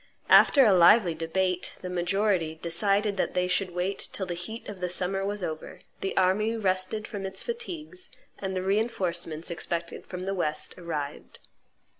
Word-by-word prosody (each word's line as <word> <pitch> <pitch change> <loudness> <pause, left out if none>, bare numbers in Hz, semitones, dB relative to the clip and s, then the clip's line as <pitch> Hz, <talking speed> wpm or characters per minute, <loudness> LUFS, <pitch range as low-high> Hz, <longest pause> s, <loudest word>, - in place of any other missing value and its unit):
After 275 -3 +7
a 210 - +6
lively 180 +1 +6
debate, 180 +3 -1
the 185 - -5
majority 180 -2 0
decided 195 +5 +1
that - - -1
they 180 0 +2
should 185 +1 +1
wait 180 +3 -3
till 190 - -3
the 180 - -3
heat 180 +7 -6
of 190 -3 -8
summer 190 +2 0
was 205 0 -3
over, 155 -2 -5 0.2
the 195 - -3
army 215 +5 +2
rested 190 +1 -1
from 205 -3 -6
its 190 0 -4
fatigues, 370 -6 -6 0.3
and 190 -1 -3
the 185 - -1
reinforcements 180 -6 -1
expected 170 0 -4
from 180 -1 -6
the 195 +1 -2
West 155 -5 -2
arrived. 150 -5 -5
185 Hz, 160 wpm, -28 LUFS, 175-205 Hz, 0.3 s, After